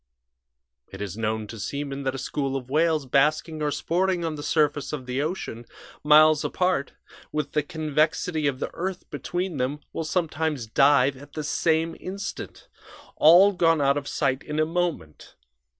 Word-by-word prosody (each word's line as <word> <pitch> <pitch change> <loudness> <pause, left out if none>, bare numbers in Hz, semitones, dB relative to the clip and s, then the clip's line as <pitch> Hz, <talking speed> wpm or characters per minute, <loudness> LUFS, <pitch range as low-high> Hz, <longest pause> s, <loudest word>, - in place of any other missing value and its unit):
"It - - -9
is 100 -2 -5
known 110 0 -2
to 110 +1 -9
seamen 140 +4 -4
that 130 0 -1
a - - -4
school 135 +1 -3
of 130 -1 -5
whales 155 -1 +2
basking 155 +4 +1
or 150 - +1
sporting 175 +3 0
on 160 - -2
the 150 - -7
surface 145 -1 0
of 135 -4 -5
the 125 +2 -2
ocean, 150 -7 -4 0.4
miles 155 0 +6
apart, 180 -6 0 0.4
with 150 -2 -2
the 150 - +1
convexity 155 +1 0
of 135 -2 -2
the - - -3
earth 185 +1 -4
between 175 -2 -3
them, 135 +4 -2
will 165 - -3
sometimes 155 -5 -1
dive 135 +3 +4
at 145 +2 -14
the 155 - -4
same 160 +2 0
instant 195 +1 -7 0.5
all 175 +6 +7
gone 165 -4 +2
out 140 -1 +3
of 145 -1 -4
sight 135 -1 0
in 150 +1 -4
a 155 - +3
moment. 165 - -3
150 Hz, 165 wpm, -25 LUFS, 135-165 Hz, 0.5 s, all